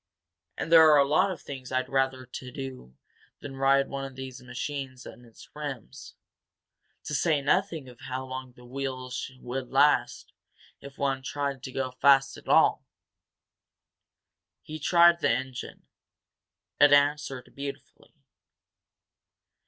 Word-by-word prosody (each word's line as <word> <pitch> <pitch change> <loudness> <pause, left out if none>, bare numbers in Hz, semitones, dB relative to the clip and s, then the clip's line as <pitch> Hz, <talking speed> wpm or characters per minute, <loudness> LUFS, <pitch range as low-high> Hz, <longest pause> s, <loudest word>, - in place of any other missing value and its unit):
And 165 - -4
there 160 -1 +8
are 150 - +7
a 140 -1 +4
lot 185 +7 +3
of 185 -5 -6
things 130 -2 -8
I'd 130 0 0
rather 130 -1 0
do 125 - -8 0.4
than 135 -1 -8
ride 135 +1 +3
one 140 0 -5
of 135 -1 -8
these 130 -1 -8
machines 130 +1 -6
on 120 +2 -12
its 115 - -16
rims 145 -6 -8 0.9
to - - -6
say 155 +1 +2
nothing 160 0 0
of 125 -1 -14
how 130 0 -5
long 130 -1 -7
the 125 0 -17
wheels 130 0 -5
would 125 +1 -5
last 145 +2 +2 0.5
if 140 0 -12
one 135 -2 -1
tried 140 0 -3
to 130 - -7
go 130 -1 -3
fast 135 +1 +4
at - - -14
all." - - +4 1.8
He 155 0 -8
tried 170 +2 +5
the - - +1
engine; 130 +1 -4 0.9
it 145 0 +7
answered 145 -3 +2
beautifully. 140 0 -9
135 Hz, 135 wpm, -27 LUFS, 130-145 Hz, 1.8 s, there